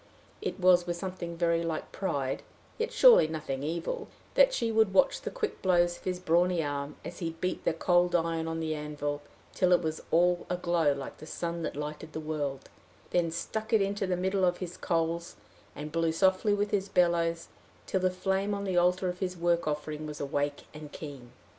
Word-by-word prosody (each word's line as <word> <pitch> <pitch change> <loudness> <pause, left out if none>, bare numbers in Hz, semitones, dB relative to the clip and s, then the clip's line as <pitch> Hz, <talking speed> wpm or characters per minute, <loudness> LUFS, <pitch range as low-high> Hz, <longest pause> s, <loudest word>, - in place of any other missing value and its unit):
It 425 - -3
was 180 -1 +5
with 175 0 -2
something 175 -2 -5
very 170 -1 +2
like 165 -2 -3
pride, 140 -8 -2 0.4
yet 460 +1 -1
surely - - +7
nothing 155 -4 -4
evil, 165 +4 -3 0.3
that - - +6
she 230 - 0
would 220 -3 +3
watch 275 +4 +4
the - - -3
quick 465 -3 -4
blows 175 -2 +3
of - - -20
his 180 -1 -1
brawny 175 0 +2
arm, 145 0 -3
as 175 - -7
he 165 -2 -3
beat 185 - -2
the - - +2
cold 175 +1 +2
iron 165 -1 0
on 165 0 -2
the 160 -1 -1
anvil 150 -1 -3 0.3
till 185 -1 +2
it 175 - +4
was 160 0 -2
all 175 +1 +3
aglow 175 -4 +2
like 140 -1 -7
the 155 - -10
sun 170 0 -3
that - - -3
lighted 150 +2 -6
the - - -3
world 145 -3 -3 0.4
then 175 -2 +2
stuck 220 +7 -4
it 220 - +6
into 200 0 -1
the 180 -1 0
middle 190 +1 0
of 180 -1 +3
his 180 -1 -6
coals, 170 0 -1 0.4
and 150 +1 -6
blew 165 0 +1
softly 190 +4 +3
with 205 0 -1
his 200 -2 0
bellows 170 -2 +2 0.4
till 190 - 0
the 185 0 +2
flame 190 +2 -1
on 200 - -4
the 190 -2 -1
altar 180 +1 +3
of 180 0 -3
his 185 -2 -2
work 170 -1 +1
offering 150 0 -3
was 150 0 -7
awake 145 0 -2
and 150 -1 -9
keen. 140 -6 -9
170 Hz, 200 wpm, -29 LUFS, 155-185 Hz, 0.4 s, surely